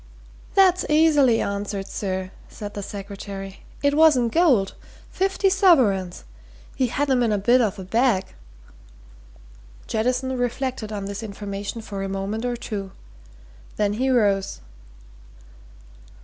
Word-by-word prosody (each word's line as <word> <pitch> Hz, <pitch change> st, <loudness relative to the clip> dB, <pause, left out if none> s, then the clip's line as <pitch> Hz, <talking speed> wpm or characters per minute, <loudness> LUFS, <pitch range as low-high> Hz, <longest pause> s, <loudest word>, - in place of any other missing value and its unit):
"That's 370 Hz, -2 st, +5 dB
easy 300 Hz, -6 st, +4 dB
answered, 200 Hz, 0 st, -3 dB
sir," 190 Hz, -2 st, -4 dB, 0.2 s
said 205 Hz, -1 st, -8 dB
the 205 Hz, -, -5 dB
secretary. 195 Hz, -1 st, -7 dB, 0.2 s
"It 285 Hz, 0 st, +3 dB
was 315 Hz, -2 st, +6 dB
in 240 Hz, -2 st, +1 dB
gold. 250 Hz, -, +3 dB, 0.4 s
Fifty 385 Hz, +1 st, +1 dB
sovereigns 255 Hz, -, +3 dB, 0.5 s
he 260 Hz, -, +1 dB
had 285 Hz, +5 st, -1 dB
'em 255 Hz, -1 st, +3 dB
in 235 Hz, -2 st, +2 dB
a 210 Hz, -, +2 dB
bit 240 Hz, +6 st, +4 dB
of 210 Hz, -3 st, 0 dB
a 190 Hz, -, -6 dB
bag." 225 Hz, 0 st, +2 dB, 1.6 s
Jettison 250 Hz, +4 st, -1 dB
reflected 245 Hz, -2 st, -2 dB
on 205 Hz, -2 st, -4 dB
this 200 Hz, +2 st, -5 dB
information 205 Hz, +1 st, -6 dB
for 200 Hz, -2 st, -6 dB
a 195 Hz, -, -3 dB
moment 195 Hz, +4 st, -3 dB
or 245 Hz, -1 st, -1 dB
two. 200 Hz, -5 st, -6 dB, 0.8 s
Then 205 Hz, -1 st, 0 dB
he 255 Hz, +5 st, 0 dB
rose. 200 Hz, -6 st, +1 dB
220 Hz, 130 wpm, -23 LUFS, 200-260 Hz, 1.6 s, was